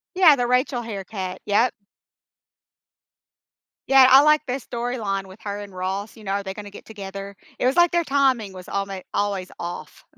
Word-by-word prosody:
Yeah. 340 Hz, -6 st, +7 dB
The 245 Hz, -2 st, -1 dB
Rachel 250 Hz, 0 st, +1 dB
haircut. 195 Hz, -4 st, -6 dB
Yep. 210 Hz, +4 st, +3 dB, 2.2 s
Yeah. 270 Hz, -1 st, +8 dB
I 265 Hz, +2 st, +9 dB
like 305 Hz, 0 st, +4 dB
the 250 Hz, -, -2 dB
storyline 235 Hz, -6 st, -3 dB
with 190 Hz, +3 st, -14 dB
her 205 Hz, 0 st, -4 dB
and 200 Hz, -2 st, -10 dB
Ross, 190 Hz, +4 st, -4 dB
you 215 Hz, -, -13 dB
know, 195 Hz, -, -1 dB
are 200 Hz, 0 st, -1 dB
they 190 Hz, 0 st, -5 dB
gonna 205 Hz, 0 st, -9 dB
get 200 Hz, -, -13 dB
together? 200 Hz, -2 st, -8 dB, 0.2 s
It -, -, -1 dB
was 260 Hz, +6 st, +2 dB
like 345 Hz, 0 st, +5 dB
their 345 Hz, -1 st, +2 dB
timing 265 Hz, -8 st, +1 dB
was 185 Hz, -1 st, -11 dB
almo 195 Hz, -1 st, -3 dB
always 200 Hz, -3 st, -1 dB
off. 175 Hz, +1 st, -7 dB
205 Hz, 175 wpm, -23 LUFS, 195-255 Hz, 2.2 s, I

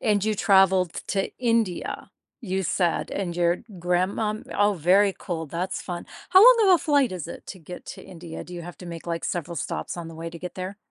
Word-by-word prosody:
And 210 Hz, -3 st, +2 dB
you 215 Hz, 0 st, +1 dB
traveled 190 Hz, -3 st, +4 dB
to 195 Hz, -1 st, 0 dB
India, 230 Hz, -7 st, -1 dB, 0.3 s
you 190 Hz, -4 st, -2 dB
said, 175 Hz, -1 st, 0 dB
and 175 Hz, -3 st, -3 dB
your 175 Hz, 0 st, +2 dB, 0.2 s
grandma 185 Hz, +5 st, 0 dB, 0.2 s
oh, 205 Hz, 0 st, +3 dB
very 190 Hz, +4 st, +4 dB
cool. 165 Hz, -2 st, -4 dB
That's 170 Hz, +5 st, -3 dB
fun. 175 Hz, -2 st, -6 dB, 0.2 s
How 375 Hz, +1 st, +8 dB
long 460 Hz, -2 st, +8 dB
of 370 Hz, -, +8 dB
a -, -, +3 dB
flight 285 Hz, -7 st, +3 dB
is 175 Hz, -4 st, -5 dB
it -, -, -9 dB
to 190 Hz, -, -8 dB
get 175 Hz, +2 st, -10 dB
to -, -, -8 dB
India? 170 Hz, -2 st, -9 dB
Do 180 Hz, -, -10 dB
you 175 Hz, -, -6 dB
have 175 Hz, +1 st, -9 dB
to 180 Hz, -, -10 dB
make, 170 Hz, -1 st, -8 dB
like, 170 Hz, -1 st, -3 dB
several 170 Hz, 0 st, -3 dB
stops -, -, -4 dB
on 170 Hz, -1 st, -6 dB
the 165 Hz, -, -10 dB
way 165 Hz, +1 st, -6 dB
to 170 Hz, -, -9 dB
get 180 Hz, +1 st, -7 dB
there? 185 Hz, +2 st, -5 dB
180 Hz, 220 wpm, -25 LUFS, 170-205 Hz, 0.3 s, How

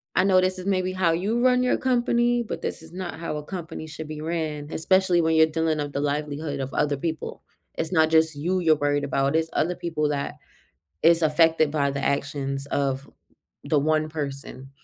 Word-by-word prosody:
I -, -, +4 dB
know 190 Hz, -1 st, +5 dB
this 185 Hz, 0 st, 0 dB
is 185 Hz, -, -7 dB
maybe 185 Hz, -1 st, +1 dB
how 180 Hz, -3 st, +2 dB
you 210 Hz, +8 st, 0 dB
run 250 Hz, 0 st, +4 dB
your 250 Hz, -, +2 dB
company, 240 Hz, -1 st, +2 dB
but 225 Hz, -, -6 dB
this -, -, -4 dB
is 160 Hz, +1 st, -14 dB
not 180 Hz, -3 st, -6 dB
how 165 Hz, -2 st, -4 dB
a 150 Hz, -, -6 dB
company 165 Hz, -2 st, -7 dB
should 155 Hz, 0 st, -8 dB
be 155 Hz, 0 st, -6 dB
ran, 155 Hz, -2 st, -3 dB
especially 185 Hz, +1 st, +3 dB
when 160 Hz, 0 st, +2 dB
you're 160 Hz, 0 st, +6 dB
dealing 160 Hz, 0 st, 0 dB
with 145 Hz, -1 st, -3 dB
the 140 Hz, -, -1 dB
livelihood 145 Hz, 0 st, -2 dB
of 135 Hz, 0 st, -4 dB
other 145 Hz, -1 st, +1 dB
people." 160 Hz, +2 st, -4 dB, 0.3 s
It's 165 Hz, -, -3 dB
not 160 Hz, -3 st, +4 dB
just 160 Hz, -1 st, +3 dB
you 175 Hz, +6 st, -1 dB
you're 160 Hz, -3 st, +4 dB
worried 145 Hz, 0 st, 0 dB
about, 140 Hz, +1 st, 0 dB
it's 160 Hz, 0 st, +1 dB
other 175 Hz, +3 st, 0 dB
people 160 Hz, -4 st, -1 dB
that 140 Hz, -1 st, -2 dB, 0.7 s
is 170 Hz, 0 st, +5 dB
affected 160 Hz, 0 st, +3 dB
by 145 Hz, -2 st, +1 dB
the 140 Hz, 0 st, -4 dB
actions 140 Hz, -1 st, -2 dB
of 140 Hz, -1 st, -1 dB, 0.5 s
the 150 Hz, -, +2 dB
one 155 Hz, +1 st, +1 dB
person. 140 Hz, -3 st, -6 dB
160 Hz, 200 wpm, -25 LUFS, 145-175 Hz, 0.7 s, you're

